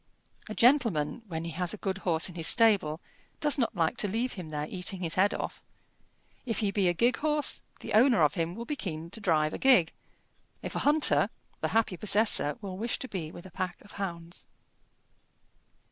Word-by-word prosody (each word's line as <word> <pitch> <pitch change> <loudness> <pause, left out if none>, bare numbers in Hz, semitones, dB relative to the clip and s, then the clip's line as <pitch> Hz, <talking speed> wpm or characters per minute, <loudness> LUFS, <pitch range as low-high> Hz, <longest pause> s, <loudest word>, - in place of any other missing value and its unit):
A 215 - -5
gentleman, 230 - +3
when 165 -3 -4
he 170 - -4
has 180 +4 -2
a - - -13
good 195 -1 -3
horse 165 -4 0
in 180 - -10
his 165 -2 -2
stable, 195 -9 +3 0.4
does 295 -1 +2
not 230 -2 0
like 165 -3 0
to 205 - 0
leave 230 +6 -1
him 180 -5 -8
there 150 -1 -3
eating 185 +1 -4
his 165 -2 -2
head 195 +3 +3
off. - - -5 0.8
If 230 -5 -3
he 205 -2 0
be 195 -2 +1
a - - +1
gig 240 +8 +2
horse, 300 -1 0 0.2
the - - -6
owner 230 - +5
of 150 - +3
him 170 0 -2
will 235 +2 -6
be 295 - -3
keen 165 - -6
to 225 - -5
drive 155 -5 +1
a - - -5
gig; 250 -12 +4 0.7
if - - -5
a - - 0
hunter, 295 +1 +3 0.3
the - - 0
happy 220 -5 +1
possessor 205 -8 +3
will 190 -2 -6
wish 230 +2 -1
to 260 - -6
be 170 -9 -5
with 175 - -11
a 185 - -11
pack 185 -1 -4
of 205 - -16
hounds. 170 -3 -6
190 Hz, 205 wpm, -29 LUFS, 165-230 Hz, 0.8 s, owner